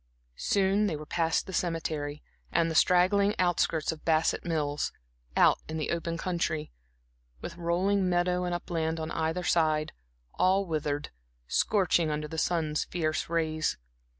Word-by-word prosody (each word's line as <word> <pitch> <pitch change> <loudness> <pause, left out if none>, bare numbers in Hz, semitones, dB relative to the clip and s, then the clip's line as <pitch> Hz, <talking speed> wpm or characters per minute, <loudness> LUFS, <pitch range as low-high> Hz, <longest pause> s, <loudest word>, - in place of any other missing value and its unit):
Soon 200 +1 +2
they 170 - -1
were 150 +1 -7
past 165 0 0
the 190 - -8
cemetery 155 -4 -2 0.3
and 165 -1 +2
the - - -2
straggling 190 +5 +4
outskirts 175 -3 +1
of 160 -1 -9
Bassett 160 -1 +2
Mills, 150 -3 -1 0.5
out - - +5
into 160 - -4
the 155 - -2
open 170 0 -2
country, 170 -3 -2 0.7
with - - -7
rolling 180 +3 +1
meadow 180 0 +1
and 175 -1 -1
upland 165 -2 -2
on 160 0 -4
either 160 +3 -1
side, 155 -3 +1 0.4
all 190 +2 +2
withered, 150 -3 -2 0.4
scorching 180 -5 +2
under 150 0 -2
the 160 +1 -4
sun's 155 -2 0
fierce 155 -3 -2
rays. 160 -2 0
165 Hz, 145 wpm, -29 LUFS, 155-180 Hz, 0.7 s, out